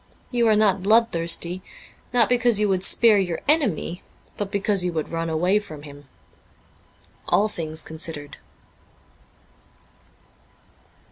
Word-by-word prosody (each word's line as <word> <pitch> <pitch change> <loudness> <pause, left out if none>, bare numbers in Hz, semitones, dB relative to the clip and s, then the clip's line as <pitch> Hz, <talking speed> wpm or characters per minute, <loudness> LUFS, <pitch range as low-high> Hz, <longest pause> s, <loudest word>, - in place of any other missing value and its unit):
You 240 -2 +2
are 215 - +4
not 200 -3 +2
bloodthirsty, 185 -4 +1 0.5
not 240 -2 +4
because 240 -3 +2
you 210 - +2
would 190 -2 0
spare 220 -1 +5
your 175 -4 -2
enemy, 220 - +1 0.3
but 205 -2 -4
because 200 -1 0
you 180 - -1
would 155 -2 -3
run 165 0 -3
away 180 +6 +1
from 155 -8 -11
him.' 145 -1 -13 0.6
' - - -33
All 210 - +3
Things 160 -5 -5
Considered.' 160 -2 -5
190 Hz, 125 wpm, -23 LUFS, 165-215 Hz, 0.6 s, spare